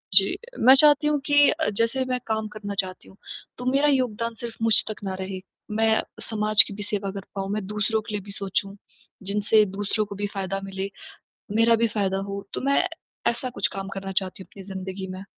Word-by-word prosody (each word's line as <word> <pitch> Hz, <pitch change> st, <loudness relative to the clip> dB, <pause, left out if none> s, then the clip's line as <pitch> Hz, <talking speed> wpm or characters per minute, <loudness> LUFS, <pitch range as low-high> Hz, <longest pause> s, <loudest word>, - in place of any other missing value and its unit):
जी। -, -, +6 dB, 0.2 s
मैं 260 Hz, +3 st, +8 dB
चाहती 295 Hz, +1 st, +8 dB
हूँ 300 Hz, -1 st, +1 dB
कि 290 Hz, -1 st, +5 dB
अ, 315 Hz, 0 st, 0 dB
जैसे 230 Hz, +5 st, 0 dB
मैं 255 Hz, -1 st, -2 dB
काम 220 Hz, -1 st, -1 dB
करना 205 Hz, -1 st, -5 dB
चाहती 185 Hz, -2 st, -4 dB
हूँ। 190 Hz, -, -18 dB, 0.4 s
तो 250 Hz, -, -7 dB
मेरा 280 Hz, +2 st, +3 dB
योगदान 235 Hz, -4 st, 0 dB
सिर्फ़ 230 Hz, -1 st, -8 dB
मुझ 225 Hz, -1 st, +5 dB
तक 210 Hz, -, -7 dB
ना 190 Hz, -1 st, -3 dB
रहे। 190 Hz, 0 st, -5 dB, 0.3 s
मैं 220 Hz, +1 st, +2 dB, 0.3 s
समाज 215 Hz, -1 st, +6 dB
की 200 Hz, -, -7 dB
भी 205 Hz, +1 st, -6 dB
सेवा 200 Hz, -2 st, -3 dB
कर 195 Hz, -1 st, -7 dB
पाऊँ। 195 Hz, 0 st, -3 dB
मैं 210 Hz, -2 st, -3 dB
दूसरों 210 Hz, +1 st, -1 dB
के 210 Hz, 0 st, -9 dB
लिए 205 Hz, -, -2 dB
भी 200 Hz, -, -9 dB
सोचूँ 195 Hz, 0 st, -2 dB, 0.5 s
जिनसे 205 Hz, +2 st, +3 dB
दूसरों 205 Hz, +1 st, -1 dB
को 200 Hz, -1 st, -9 dB
भी 205 Hz, +1 st, -3 dB
फ़ायदा 195 Hz, 0 st, -3 dB
मिले, 195 Hz, 0 st, -5 dB, 0.7 s
मेरा 230 Hz, +1 st, +5 dB
भी 230 Hz, +1 st, +1 dB
फ़ायदा 195 Hz, -3 st, -1 dB
हो 200 Hz, 0 st, -6 dB
तो -, -, -3 dB
मैं 275 Hz, +1 st, +2 dB, 0.4 s
ऐसा 235 Hz, +2 st, -1 dB
कुछ 200 Hz, -, +2 dB
काम 195 Hz, 0 st, -5 dB
करना 195 Hz, 0 st, -6 dB
चाहती 190 Hz, 0 st, -2 dB
हूँ -, -, -22 dB
अपनी 195 Hz, -, -10 dB
ज़िंदगी 190 Hz, 0 st, -6 dB
में। 185 Hz, +1 st, -7 dB
210 Hz, 210 wpm, -24 LUFS, 195-230 Hz, 0.7 s, मैं